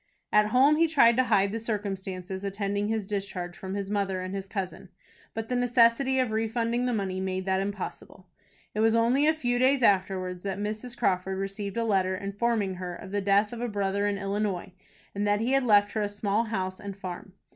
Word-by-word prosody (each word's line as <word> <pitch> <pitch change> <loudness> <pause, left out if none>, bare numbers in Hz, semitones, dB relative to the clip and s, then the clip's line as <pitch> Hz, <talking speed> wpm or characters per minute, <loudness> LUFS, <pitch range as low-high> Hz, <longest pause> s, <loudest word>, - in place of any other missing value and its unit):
At 210 0 +5
home 270 +7 +5
he 330 +1 +4
tried 270 -7 +5
to 255 - +4
hide 200 -4 +3
the 225 - -3
circumstances 195 -3 -4
attending 200 +1 -2
his 220 -2 -1
discharge 195 -3 -4
from 190 0 -6
his 200 0 -4
mother 195 -2 0
and 185 +1 -5
his 195 0 -4
cousin; 195 -2 -5 0.5
but 225 0 -3
the 250 - -1
necessity 245 +2 +3
of 255 -3 +1
refunding 230 +2 0
the - - +1
money 195 -4 -2
made 190 0 -2
that 190 0 +1
impossible. 195 -1 -6 0.5
It 210 - -3
was 225 +1 +4
only 245 +6 +3
a 315 - +5
few 245 -5 0
days 260 0 +3
afterwards 185 -3 +1
that 195 -1 -3
Mrs. 215 +4 -4
Crawford 190 +1 0
received 195 +2 -4
a 230 - +1
letter, 190 -4 +1
informing 200 0 -1
her 180 -1 -5
of 190 +1 -10
the 205 0 0
death 200 +3 +2
of 235 - -6
a 245 - -1
brother 200 -1 0
in 205 -1 -1
Illinois, 200 -1 -2 0.4
and 205 +1 -1
that 205 0 +2
he 235 +4 0
had 270 -1 +3
left 205 -2 +5
her 220 - -1
a 205 - 0
small 205 +2 0
house 185 -4 -3
and 200 -1 -7
farm. 185 0 -7
205 Hz, 210 wpm, -27 LUFS, 195-230 Hz, 0.5 s, At